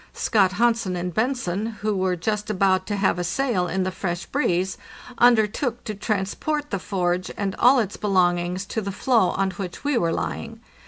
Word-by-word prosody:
Scott 195 -4 +2
Hansen 230 -3 +1
and 180 0 -3
Bentzen, 220 -4 -1
who 210 -1 0
were 185 -1 +1
just 210 +4 -2
about 190 -2 +2
to 205 - -1
have 195 -3 +1
a - - -1
sail 190 -1 0
in 190 +1 -1
the 185 - -1
fresh 175 -1 -3
breeze, 190 -9 0 0.4
undertook 240 +1 +3
to 215 - -4
transport 215 +9 -2
the 200 - -1
forge 180 -1 -1
and 195 -2 -1
all 255 +3 +6
its 210 -5 -1
belongings 180 -2 +1
to 220 - -3
the 200 -1 -4
floe 225 -1 +2
on 195 0 0
which 180 -1 -7
we 285 -4 +1
were 165 -4 +1
lying. 225 +6 -4
195 Hz, 180 wpm, -24 LUFS, 185-225 Hz, 0.4 s, all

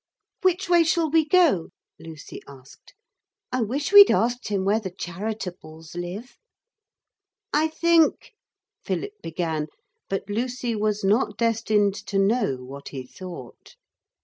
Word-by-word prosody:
'Which 375 +1 +1
way 345 -1 +5
shall 325 -1 +1
we 320 -1 +4
go?' 305 - +3 0.3
Lucy 160 -2 -10
asked. 135 -1 -16 0.6
'I 255 - 0
wish 275 - -2
we'd 405 0 +10
asked 245 +2 +1
him 200 -3 -1
where 205 +3 +2
the 200 -4 -5
Charitables 180 -4 -7
live.' 180 +8 -7 1.2
'I 305 +2 +3
think,' 330 0 +2 0.5
Philip 405 0 -3
began; 160 -2 -3 0.4
but 195 0 -3
Lucy 240 +2 -2
was 210 -1 -1
not 210 +1 +1
destined 220 -3 +1
to 200 - -2
know 195 - +2
what 140 +2 -10
he 130 -2 -7
thought. 170 -4 -11
210 Hz, 125 wpm, -24 LUFS, 175-270 Hz, 1.2 s, we'd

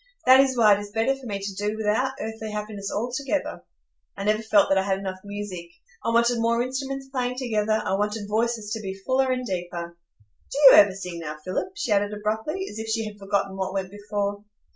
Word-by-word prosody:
That 260 +1 +8
is 265 -2 +3
why 215 -3 +7
it 200 - +1
is 205 0 -7
better 225 +5 +1
for 270 -2 -10
me 200 -2 -2
to 195 0 -5
do 210 +2 -2
without 220 +5 +1
earthly 220 0 -5
happiness 210 -1 -5
altogether. 255 +6 -2 0.6
I 195 - -4
never 215 +1 +2
felt 215 -2 +4
that 195 - +3
I - - +2
had 190 0 0
enough 190 -1 -5
music,—I 185 -4 -7
wanted 235 +1 +3
more 230 +1 +2
instruments 270 +1 -4
playing 250 -2 -2
together; 220 -4 0
I - - 0
wanted 210 +1 -1
voices 220 0 -1
to 220 0 -3
be 190 -2 -5
fuller 260 0 +2
and 255 0 -1
deeper. 175 -3 -4 0.6
Do - - -4
you 275 -3 +10
ever 200 -2 +8
sing 180 -3 -6
now, 155 -2 -6
Philip?" 280 - -2
she 405 - -3
added 205 0 +2
abruptly, 220 - -2
as 210 - -8
if 220 - -5
she 220 0 -1
had 210 -1 -8
forgotten 195 -1 -1
what 190 0 -3
went 190 -1 -2
before. 205 0 -3
210 Hz, 210 wpm, -25 LUFS, 200-240 Hz, 0.6 s, you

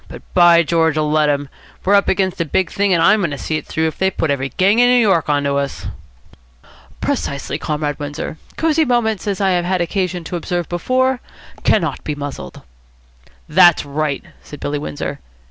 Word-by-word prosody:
But, - - -11
by 170 -1 +6
George, 160 -1 +1
let 155 0 +2
'em! 145 0 -1 0.4
We're 195 - +3
up 200 -1 +4
against 190 -2 0
a - - 0
big 175 +4 0
thing, 200 -1 +1
and 170 -2 +3
I'm 210 +4 +5
going 170 - 0
to 145 - -5
see 155 +3 -2
it - - -8
through 160 - -1
if 160 - -3
they 190 - +3
put 160 -5 -1
every 135 -1 -1
gang 200 +7 +2
in 245 0 +5
New 250 0 +5
York 190 -9 +2
on 145 -1 +2
to 140 0 0
us." 140 0 -3 1.2
"Precisely, 140 -1 -2
Comrade 150 -1 -3
Windsor. 145 +2 -5 0.2
Cosy 320 0 +2
Moments, 230 -6 0
as 200 -1 -1
I 195 -1 +2
have 175 -1 +1
had 185 +1 0
occasion 180 0 -2
to 175 - -5
observe 175 0 -3
before, 255 +9 0 0.4
cannot 165 -10 +1
be 150 - -3
muzzled." 140 - -7 0.8
"That's 175 -4 +5
right," 145 0 -2 0.2
said 145 - -11
Billy 145 0 -3
Windsor. 75 - -5
170 Hz, 195 wpm, -18 LUFS, 150-195 Hz, 1.2 s, by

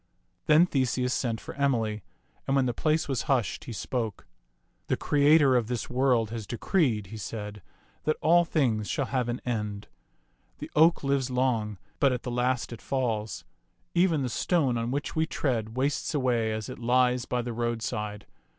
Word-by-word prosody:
Then 155 +3 +7
Theseus 130 -4 0
sent 115 -3 -1
for - - -8
Emily, 115 -7 0 0.5
and 135 - +2
when 135 -2 +3
the 120 - 0
place 155 +6 +1
was 135 -3 -1
hushed, 130 -6 0
he - - -6
spoke. 115 -2 -3 0.3
" - - -45
The - - 0
Creator 145 -2 +4
of 120 -3 +2
this 125 0 -3
world 125 -4 +2
has 115 -3 -5
decreed," 120 - +1
he - - -5
said, 105 0 -6 0.2
" - - -35
that 155 - +1
all 170 +3 +5
things 125 -11 0
shall 140 - 0
have 125 0 -1
an 120 - -3
end. 105 -4 -3 0.7
The - - -8
oak 160 +1 +5
lives 135 -2 +1
long, 120 -5 0 0.2
but 140 - +4
at 125 -1 -3
the 125 - -4
last 125 0 0
it 115 - -10
falls. 115 -6 -2 0.5
Even 170 -5 +3
the 125 - -1
stone 140 0 +1
on 115 0 -1
which 140 +5 -3
we 160 0 +1
tread 115 -6 -2
wastes 140 +3 0
away 120 -5 +1
as 110 -1 -3
it - - -8
lies 125 0 +2
by 125 -1 -1
the 120 0 -4
roadside. 110 -3 -3
125 Hz, 180 wpm, -28 LUFS, 115-140 Hz, 0.7 s, Then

